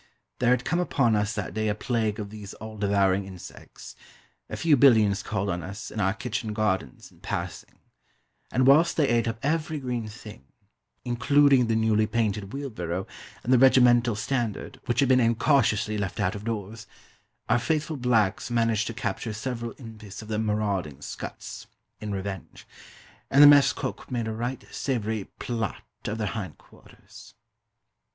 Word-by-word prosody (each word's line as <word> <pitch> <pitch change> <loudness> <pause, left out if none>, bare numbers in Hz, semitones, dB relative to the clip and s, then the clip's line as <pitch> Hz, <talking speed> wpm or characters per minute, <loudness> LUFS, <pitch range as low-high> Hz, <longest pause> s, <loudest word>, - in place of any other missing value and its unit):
There 125 - +2
had 125 - +2
come 170 +2 0
upon 135 -10 +2
us 105 +2 0
that 100 -3 -4
day 110 0 -1
a 105 - 0
plague 110 -2 -1
of 100 -1 -6
these 105 -2 -9
all 110 0 -9
devouring 100 -2 +1
insects. 95 -2 -11 0.5
A - - -5
few 160 -3 +4
billions 110 -7 +5
called 100 -2 -2
on 90 -2 -2
us, 100 +6 -7
in 110 - -5
our 95 0 +1
kitchen 115 -3 -4
gardens, 95 - -2
in - - -22
passing; - - -5 0.8
and 130 +1 +2
whilst 150 +5 +5
they 150 -4 +3
ate 120 -1 +2
up 115 -1 -2
every 155 +1 0
green 125 -4 -3
thing 105 - -11 0.6
including 135 +1 +4
the 115 - +1
newly 110 -1 +2
painted 105 -4 -1
wheelbarrow, 95 -10 -4 0.4
and 125 - +2
the 125 - +6
regimental 120 -3 +5
standard, 115 0 -3
which 120 +3 +1
had 135 - +2
been 130 -1 +5
incautiously 115 -3 +2
left 95 -3 -3
out 90 - +1
of 105 0 -8
doors 115 0 -5 0.6
our - - +3
faithful 155 +3 -1
blacks 115 -7 +1
managed 115 -2 +1
to 115 - -5
capture 110 0 -3
several 115 +1 -4
impis 110 -4 -10
of 110 - -12
the 110 -1 -1
marauding 100 -9 -1
scuts, - - -7 0.3
in 105 -1 -5
revenge; 95 -2 -6 0.6
and 140 +2 +7
the - - +11
mess 145 -1 +7
cook - - -6
made 120 -3 -2
a 110 - -2
right 120 +4 -4
savoury 110 -6 -2
plât 115 -4 -2 0.3
of 105 - -2
their 110 - -2
hind 100 -6 -5
quarters. - - -17
110 Hz, 165 wpm, -26 LUFS, 105-125 Hz, 0.8 s, the